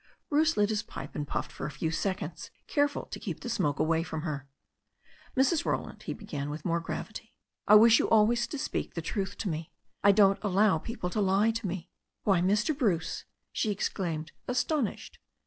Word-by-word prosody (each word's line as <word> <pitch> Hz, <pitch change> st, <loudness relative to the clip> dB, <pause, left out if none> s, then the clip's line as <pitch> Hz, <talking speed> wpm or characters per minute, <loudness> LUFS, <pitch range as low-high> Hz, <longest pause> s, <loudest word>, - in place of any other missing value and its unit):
Bruce 310 Hz, +2 st, +3 dB
lit 205 Hz, 0 st, +3 dB
his 215 Hz, -1 st, 0 dB
pipe 215 Hz, -, -8 dB
and 145 Hz, -1 st, -4 dB
puffed -, -, -3 dB
for -, -, -5 dB
a -, -, -4 dB
few 160 Hz, +1 st, -2 dB
seconds, 190 Hz, +4 st, -3 dB, 0.2 s
careful 290 Hz, -1 st, +1 dB
to -, -, -7 dB
keep -, -, -5 dB
the 245 Hz, -, -5 dB
smoke 185 Hz, -11 st, 0 dB
away 160 Hz, +1 st, +2 dB
from 160 Hz, -2 st, -4 dB
her. 145 Hz, -4 st, -4 dB, 0.9 s
"Mrs. 280 Hz, +5 st, +3 dB
Roland," -, -, -2 dB
he -, -, -4 dB
began, 145 Hz, -1 st, -5 dB
with 150 Hz, +1 st, -6 dB
more 170 Hz, -1 st, +1 dB
gravity, 220 Hz, +7 st, -6 dB, 0.3 s
"I 210 Hz, -, +8 dB
wish 225 Hz, +1 st, +8 dB
you -, -, +1 dB
always 230 Hz, +2 st, +4 dB
to 290 Hz, -, -5 dB
speak -, -, -3 dB
the 165 Hz, -, -3 dB
truth 190 Hz, +2 st, -3 dB
to 215 Hz, -, -3 dB
me. 160 Hz, -2 st, -3 dB, 0.3 s
I 200 Hz, -, +8 dB
don't 195 Hz, -1 st, +4 dB
allow 200 Hz, -3 st, +3 dB
people 180 Hz, -2 st, -4 dB
to 210 Hz, -, 0 dB
lie 200 Hz, +3 st, +3 dB
to 225 Hz, -2 st, -3 dB
me." 180 Hz, -1 st, -5 dB, 0.3 s
"Why, 195 Hz, -4 st, +3 dB
Mr. 210 Hz, -, +2 dB
Bruce," 205 Hz, -, 0 dB, 0.3 s
she 220 Hz, -, 0 dB
exclaimed, 170 Hz, -6 st, -2 dB, 0.2 s
astonished. 250 Hz, -1 st, -1 dB
200 Hz, 190 wpm, -29 LUFS, 165-225 Hz, 0.9 s, I